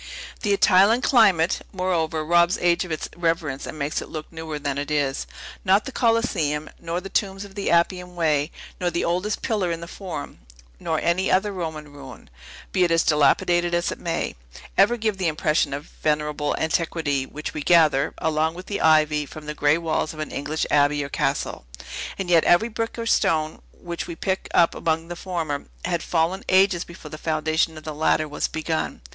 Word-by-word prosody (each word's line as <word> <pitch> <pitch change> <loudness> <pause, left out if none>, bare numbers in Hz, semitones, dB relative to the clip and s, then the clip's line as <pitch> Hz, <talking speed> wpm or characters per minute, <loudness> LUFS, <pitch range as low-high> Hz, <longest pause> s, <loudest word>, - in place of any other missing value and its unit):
The 210 - 0
Italian 200 +4 +5
climate, 195 -9 +4
moreover, 165 -4 -1
robs 175 +3 +4
age 175 0 +2
of 180 - -8
its 155 - -3
reverence 165 -5 -1
and - - -7
makes 145 +1 -2
it - - -9
look 155 +1 -7
newer 160 -2 -5
than 140 -1 -2
it 145 - -4
is. 145 -3 0 0.4
Not 195 +3 +3
the 270 - -5
Coliseum, 225 - 0
nor 170 +1 -3
the 190 - -8
tombs 195 0 -1
of 200 - -13
the 200 0 -2
Appian 180 +1 +1
Way, 155 -3 +1 0.3
nor 180 - +1
the 170 0 -1
oldest 180 +5 -1
pillar 200 -6 0
in 165 - -3
the 170 - -8
Forum, 170 -6 -7 0.4
nor - - -1
any 175 +3 +1
other 200 +3 +2
Roman 160 -5 -6
ruin, 135 - -12 0.4
be 185 - +2
it 175 - +3
as 165 0 +3
dilapidated 175 +3 +3
as 175 - 0
it - - -6
may, 170 -1 -2 0.4
ever 220 +5 +4
give 215 -3 -1
the 185 - +1
impression 155 -1 +1
of 145 +3 -6
venerable 150 -1 0
antiquity 160 -4 -1
which 150 +1 -6
we 150 - -4
gather, 155 -4 +4
along 160 +1 0
with 180 +1 -9
the 200 0 -3
ivy, 155 -2 +3
from 155 +1 -10
the 150 - -4
gray 150 +1 +3
walls 160 -1 -2
of - - -11
an 155 - -4
English 150 +3 -2
abbey 145 0 +3
or 140 - -6
castle. 135 - -2 0.5
And 195 - -3
yet 170 -2 +5
every 215 +7 +4
brick 225 +1 -4
or 230 - -3
stone, 155 -8 +1
which 170 -1 -6
we 170 - -6
pick 190 +3 -2
up 170 - +4
among 165 +1 -1
the 175 - -5
former, 165 -6 -3 0.2
had 170 -2 -1
fallen 175 +3 0
ages 185 -2 +4
before 165 -3 -12
the 155 - -8
foundation 160 0 0
of 155 - -10
the 155 - -5
latter 155 0 +1
was 145 - -2
begun. 160 0 -3
165 Hz, 195 wpm, -23 LUFS, 150-180 Hz, 0.5 s, Italian